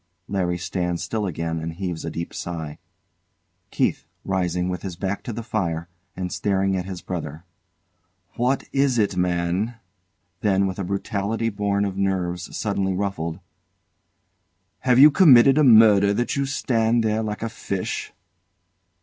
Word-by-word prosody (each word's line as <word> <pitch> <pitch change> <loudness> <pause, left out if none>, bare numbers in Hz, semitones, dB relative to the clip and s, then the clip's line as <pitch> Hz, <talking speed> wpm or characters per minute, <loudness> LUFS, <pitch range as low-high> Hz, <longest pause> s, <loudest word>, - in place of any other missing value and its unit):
LARRY 90 -3 -1
stands 90 0 -2
still 110 -3 -2
again 80 -1 -3
and 80 +1 -5
heaves 85 -2 -4
a - - -3
deep 85 0 -5
sigh. 80 -3 -6 0.9
KEITH. - - -1 0.2
[Rising, 90 -2 -1
with 90 -1 -3
his 95 -3 -6
back 95 +3 -3
to - - -6
the 115 +1 -5
fire, 85 -6 -2 0.3
and 90 -1 -4
staring 95 -1 0
at 90 -1 -2
his 95 -2 -7
brother] 80 -3 -5 0.9
What 125 +3 +1
is 135 -2 +2
it, 105 -3 +1
man? 90 +5 0 0.6
[Then 100 -1 +2
with 95 0 -3
a - - -1
brutality 100 +4 -2
born 100 -1 0
of 95 -1 -4
nerves 90 -2 -2
suddenly 100 -3 -1
ruffled] 95 -3 -3 1.4
Have 125 -1 +2
you 145 +3 +9
committed 135 -5 +7
a - - +5
murder 105 -5 +6
that 120 - -1
you 140 -1 0
stand 115 -3 +1
there 110 0 +1
like 105 0 -4
a - - -1
fish? 100 -4 -4
95 Hz, 150 wpm, -23 LUFS, 90-110 Hz, 1.4 s, you